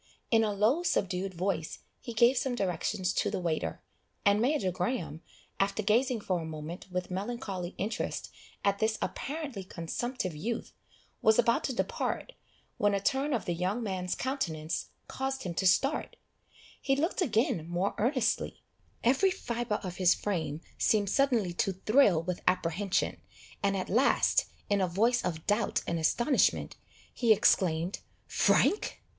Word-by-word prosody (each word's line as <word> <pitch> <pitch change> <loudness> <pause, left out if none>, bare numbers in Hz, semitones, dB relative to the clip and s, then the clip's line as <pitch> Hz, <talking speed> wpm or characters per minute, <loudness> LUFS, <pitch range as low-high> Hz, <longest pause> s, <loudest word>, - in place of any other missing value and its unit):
In 225 -1 +5
a 215 - +1
low 215 - +2
subdued 190 - -1
voice 175 -3 -2 0.2
he 235 - -7
gave 240 +4 +5
some 250 0 0
directions 185 -1 -1
to - - +1
the 200 -1 -2
waiter, 170 -3 -2 0.4
and 200 +1 +4
Major 250 -7 +1
Graham, 175 - -3 0.4
after 200 +2 +1
gazing 235 +3 +2
for 185 -3 -1
a - - -5
moment 160 +3 -7
with 180 0 -3
melancholy 195 -3 -4
interest 205 +4 -3 0.3
at 200 0 +2
this 220 0 +1
apparently 280 -8 -4
consumptive 185 +2 -4
youth, 225 +9 -4 0.5
was 220 0 +5
about 235 -1 +3
to 265 - -1
depart, 375 - -2 0.5
when 205 -1 +2
a - - +1
turn 270 +8 0
of 240 -6 -1
the 175 - -1
young 185 +7 -1
man's 185 -3 -2
countenance 170 - -2 0.2
caused 265 0 -3
him 180 - -3
to 190 +3 +1
start; 275 +11 +2 0.7
he 270 - +2
looked 325 +7 0
again 220 - +1
more 175 +3 0
earnestly 245 +1 0 0.4
every 270 +11 +4
fibre 235 - -2
of 180 -2 -5
his 185 -1 +5
frame 160 -6 -2 0.2
seemed 205 -3 +2
suddenly 240 -10 +2
to 190 +2 0
thrill 195 - +4
with 180 0 -3
apprehension, 185 +2 0 0.4
and 200 -1 +1
at 185 - -3
last, 250 +7 +3 0.2
in 200 -1 +2
a 185 - +2
voice 225 +8 +2
of 160 -3 -3
doubt 210 +2 +1
and 170 - -1
astonishment, 235 - +2 0.4
he 235 -3 +2
exclaimed, 180 -4 +3 0.3
"Frank!" 420 - +2
200 Hz, 150 wpm, -30 LUFS, 180-240 Hz, 0.7 s, In